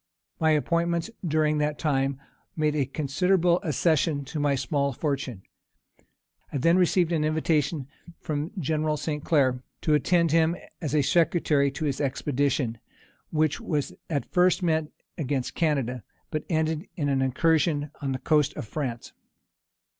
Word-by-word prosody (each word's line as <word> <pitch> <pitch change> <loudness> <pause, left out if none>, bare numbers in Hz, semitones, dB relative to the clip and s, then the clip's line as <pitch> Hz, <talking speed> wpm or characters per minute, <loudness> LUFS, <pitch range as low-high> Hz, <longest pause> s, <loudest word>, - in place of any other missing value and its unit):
My 160 - +3
appointments 170 +5 +1
during 155 -2 +1
that 150 0 0
time 135 -3 0 0.4
made 150 -1 +1
a 140 -4 +1
considerable 170 +5 +2
accession 155 - +1
to 150 +3 -5
my 145 -1 +2
small 140 +1 0
fortune. 130 - -3 1.1
I - - -2
then 165 +6 +4
received 180 -1 +3
an 160 -3 +1
invitation 155 -2 0 0.3
from 150 +1 -3
General 155 -1 0
St. 150 -1 -3
Clair 130 -5 +2 0.2
to 155 - +2
attend 170 +2 +3
him 165 +1 +3 0.3
as 155 -2 -2
a 145 - +4
secretary 155 -3 +2
to 155 +3 -3
his 140 -1 -1
expedition, 135 -3 0 0.5
which 155 +6 +1
was 150 -10 -2 0.2
at 145 -4 -3
first 180 +1 +3
meant 160 -3 +1 0.3
against 135 -3 -2
Canada, 135 -7 0 0.3
but 155 - -3
ended 160 +1 0
in 145 -5 -1
an 135 -1 +1
incursion 145 +2 +1
on 140 -2 -1
the 130 - -1
coast 150 +1 +2
of - - -5
France. 125 -3 -4
150 Hz, 145 wpm, -26 LUFS, 140-160 Hz, 1.1 s, then